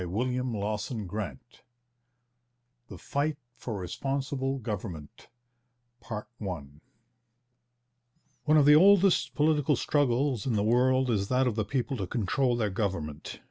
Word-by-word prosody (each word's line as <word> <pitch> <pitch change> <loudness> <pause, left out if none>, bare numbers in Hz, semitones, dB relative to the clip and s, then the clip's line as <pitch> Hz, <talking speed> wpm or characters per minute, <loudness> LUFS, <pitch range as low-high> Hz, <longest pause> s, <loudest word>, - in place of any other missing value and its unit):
CHAPTER 110 0 -2
IV 75 -10 -5 1.5
THE 95 - -10
FIGHT 145 - -2 0.2
FOR 120 -2 -6
RESPONSIBLE 135 +7 -3
GOVERNMENT 95 - -7 0.7
One 100 - -7 1.9
of 145 - +5
the 150 - +8
oldest 195 +2 +5
political 150 -1 +2
struggles 135 -3 0
in 125 - +1
the 105 -2 +1
world 130 +3 +3
is 100 -3 0
that 130 +3 +2
of 125 - +1
the 110 0 -1
people 130 +3 -2
to 95 -4 -3
control 120 +4 0
their 110 -4 -1
government. 90 -8 -4
120 Hz, 110 wpm, -28 LUFS, 100-135 Hz, 1.9 s, the